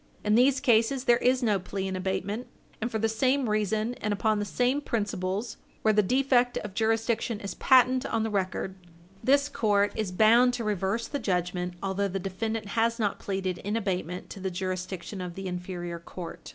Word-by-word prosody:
In 210 - +3
these 255 +4 +5
cases, 240 +2 +3
there 240 -3 +5
is 255 +1 +2
no 210 -4 +2
plea 190 +1 -4
in 190 - -3
abatement. 195 +5 -2 0.3
And 230 - -1
for 225 - -2
the 220 +1 +1
same 255 +4 +1
reason, 215 +2 0
and 210 - -1
upon 215 +1 +1
the 205 - -1
same 250 +7 +1
principles, 205 -2 -2 0.3
where 220 - +4
the 210 - +5
defect 250 +2 +2
of 210 -2 -5
jurisdiction 225 +1 0
is 200 -3 -5
patent 255 -1 +4
on 225 -1 0
the 220 - -2
record, 190 -1 -1 0.5
this 280 +2 +4
court 205 -6 +2
is 215 -4 -2
bound 235 +6 +5
to 240 - -3
reverse 210 +2 -1
the 285 - -3
judgment 180 -2 -1
although 195 +1 0
the 195 0 -3
defendant 205 +3 -3
has 230 +1 +1
not 210 -4 -1
pleaded 190 -2 -3
in 210 +3 -2
abatement 180 -4 -3
to - - -8
the 190 0 -2
jurisdiction 185 +1 -4
of 180 -1 -6
the 195 - -6
inferior 180 -1 -5
court. 170 0 -9
210 Hz, 190 wpm, -28 LUFS, 190-235 Hz, 0.5 s, these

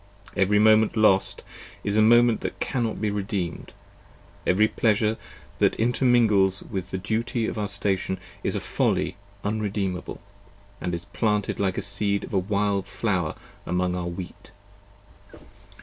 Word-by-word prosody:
Every 100 +2 +3
moment 110 +1 +4
lost, 100 -3 +3 0.4
is 100 - -1
a 110 - +5
moment 120 +1 +5
that - - -5
cannot 120 -5 -2
be 105 0 -1
re 105 0 -1
deemed: 95 -4 -4 0.8
every 105 +4 +4
pleasure 110 0 +1 0.4
that - - +3
intermingles 115 -5 +3
with 95 -3 -5
the 95 - -3
duty 110 +4 -1
of 110 - -3
our 105 - -1
station 95 -1 +1 0.2
is - - 0
a - - 0
folly - - 0 0.3
unredeemable, 100 -3 -3 0.4
& 100 0 -29
is 85 -1 -3
planted 105 +1 -1
like 95 -2 0
the - - -2
seed 100 0 +1
of - - -9
a 95 - +3
wild 100 0 -1
flower 90 -8 -1 0.3
among 90 0 0
our 90 -1 -3
wheat. 85 +1 -8
100 Hz, 145 wpm, -25 LUFS, 95-110 Hz, 0.8 s, a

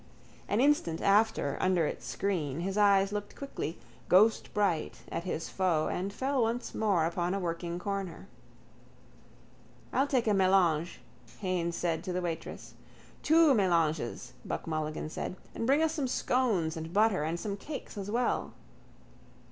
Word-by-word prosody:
An 205 - +1
instant 255 - +2
after, 200 -8 +2
under 185 -3 +2
its - - -5
screen, 165 -7 -2
his 190 +2 -2
eyes 200 -1 +4
looked 205 0 -5
quickly, 275 - -5 0.3
ghostbright, 200 -3 +2
at 170 +2 -3
his 165 -3 -3
foe 175 -5 +1
and 190 +2 -2
fell 265 +5 0
once 235 +2 -1
more 195 -7 +2
upon 175 +2 -1
a - - -1
working 170 -1 -3
corner. 195 -1 -4 1.7
—I'll 270 +2 +2
take 255 -4 +1
a 215 - +2
mélange, 185 -4 +3 0.4
Haines 175 -3 -1
said 165 -2 -1
to 185 - -3
the 180 - -1
waitress. 165 -1 -5 0.5
—Two 320 -2 +5
mélanges, 160 - +1
Buck - - -4
Mulligan 155 -1 -3
said. - - -4 0.2
And 230 - -3
bring 285 +4 +4
us 320 0 +1
some 290 -5 -1
scones 220 -11 +1
and 160 0 -6
butter 210 -2 +3
and 165 +2 -2
some 200 0 -3
cakes 280 +7 -7
as 200 -1 -5
well. 240 +3 0
190 Hz, 150 wpm, -30 LUFS, 165-220 Hz, 1.7 s, Two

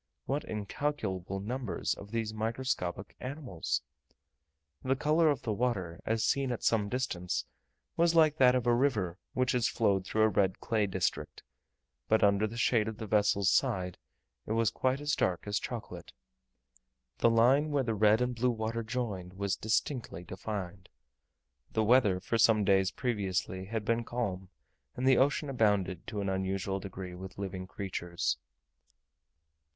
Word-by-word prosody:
What 140 +3 -1
incalculable 105 -4 -3
numbers 120 +2 -2
of 100 - -10
these 110 -1 -2
microscopical 110 -4 -2
animals! 130 - -3 1.0
The 130 +1 +2
colour 155 +4 +3
of 140 -3 0
the 110 - -1
water, 100 -8 -2
as 110 0 +1
seen 135 -2 +1
at 120 - -4
some 105 -3 +2
distance, 95 -8 -2 0.5
was 170 0 +3
like 155 -2 +5
that 130 -2 +6
of 125 - 0
a 120 - +4
river 110 -9 +1
which 130 0 +1
has 125 -2 +2
flowed 100 -4 +1
through 110 +3 +1
a - - +6
red 95 -2 +1
clay 110 -3 0
district, 95 -1 -2 0.6
but 110 - +3
under 100 +1 +4
the 115 +2 -8
shade 115 -2 +2
of 110 -1 -5
the 110 - -5
vessel's 100 -2 +3
side 90 -1 0 0.5
it 110 - -1
was 115 -1 +2
quite 130 +2 0
as 150 +1 0
dark 90 -2 0
as 100 0 0
chocolate. 120 - -7 1.1
The 115 - +5
line 125 +7 +4
where 145 -2 +1
the 115 -2 -1
red 105 +2 +4
and 125 0 0
blue 125 +1 +1
water 115 0 -2
joined 110 -6 -4
was 100 0 -1
distinctly 110 - -2
defined. 95 0 -6 0.8
The 110 - +2
weather 105 -5 +4
for 115 +5 -1
some 110 -1 +5
days 95 -1 +3
previously 95 -4 -2
had 110 +1 -3
been 115 +1 +1
calm, 95 -6 -3 0.5
and 130 +1 -1
the 130 -2 +6
ocean 140 +2 +2
abounded, 105 - +1
to 105 - -3
an 100 - -2
unusual 95 +1 -1
degree, 95 -2 -7
with 95 +1 -9
living 95 -2 -5
creatures. 90 -3 -3
110 Hz, 155 wpm, -31 LUFS, 95-125 Hz, 1.1 s, that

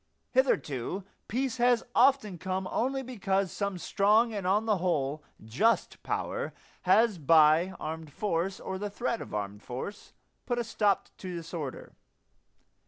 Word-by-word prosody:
Hitherto 190 - +1 0.2
peace 255 +1 -1
has 245 -1 +3
often 250 -8 +3
come 185 +1 -2
only 265 +3 0
because 195 -6 -1
some 200 -2 -2
strong 215 +5 +3
and 200 -3 -3
on 205 +4 +2
the 215 -3 +2
whole 150 -4 0 0.2
just 205 - +1
power - - -3 0.4
has 210 -1 +5
by 160 +4 +5
armed 160 -1 -5
force, 185 +2 -1
or 190 0 -5
the 205 +1 -3
threat 235 +2 -2
of - - -8
armed 105 0 -4
force, 130 - -7 0.3
put 245 - 0
a 240 - 0
stop 205 -3 +1
to 185 -2 -5
disorder. 165 -5 -6
195 Hz, 140 wpm, -29 LUFS, 165-225 Hz, 0.4 s, has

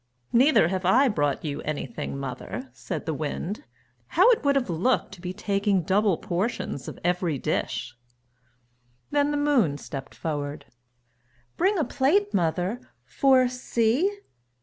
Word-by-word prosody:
"Neither 250 - +5
have 190 0 -2
I 245 +10 +5
brought 145 - 0
you 145 -1 -3
anything, 155 +1 -4
mother!" 130 -1 -6
said 125 -1 -5
the 160 - -1
Wind. 165 - -4 0.4
"How - - +5
it 460 - +1
would 280 -1 +3
have 270 -3 +1
looked 185 +9 0
to 190 -3 -12
be 180 0 -4
taking 200 0 0
double 195 0 +2
portions 180 - -3
of - - -7
every 175 -3 0
dish!" 120 -1 -2 1.2
Then 290 0 +2
the 295 - 0
Moon 260 - +2
stepped 135 -2 -8
forward. 145 -2 -4 0.9
"Bring 385 +3 +2
a 320 - +2
plate, 385 +10 +2
mother, 180 +6 0 0.2
for 260 -2 +4
see!" 250 - +1
195 Hz, 140 wpm, -26 LUFS, -, 1.2 s, Neither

